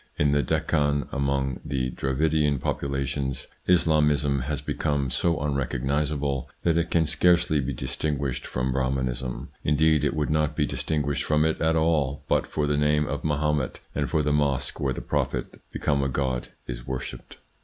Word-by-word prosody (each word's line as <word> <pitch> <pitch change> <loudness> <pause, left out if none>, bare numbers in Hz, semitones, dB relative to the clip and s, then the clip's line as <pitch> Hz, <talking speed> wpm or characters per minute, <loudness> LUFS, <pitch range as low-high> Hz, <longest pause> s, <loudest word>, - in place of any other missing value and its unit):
In 75 -1 +3
the 70 0 +3
Deccan, 70 -1 +1
among 70 -1 0
the 65 -2 -2
Dravidian 75 +2 +1
populations, 70 0 -2 0.2
Islamism 75 -5 +3
has 70 +3 -2
become 70 -4 -1
so 85 +4 +1
unrecognisable 70 0 -1
that 85 -2 +3
it 85 0 +1
can 80 -1 +3
scarcely 85 -2 +3
be 70 +1 -2
distinguished 65 +1 -2
from 65 +1 -1
Brahmanism; 65 -1 -2
indeed 75 0 +3
it 75 +3 +1
would 75 -1 0
not 75 -1 +1
be - - +2
distinguished 75 -2 -1
from 75 0 +2
it 80 - 0
at 80 0 +3
all 80 -4 +1
but - - +2
for 75 - -1
the 75 0 +1
name 75 0 +3
of - - -4
Mahomet, 75 -2 0
and - - -1
for 75 - +1
the 75 0 +1
mosque 70 -3 0
where 70 - 0
the - - -4
prophet, - - -2
become 70 -1 0
a 70 - 0
god, 65 -2 -1 0.2
is - - -7
worshipped. 65 -1 -6
70 Hz, 165 wpm, -26 LUFS, 65-75 Hz, 0.2 s, In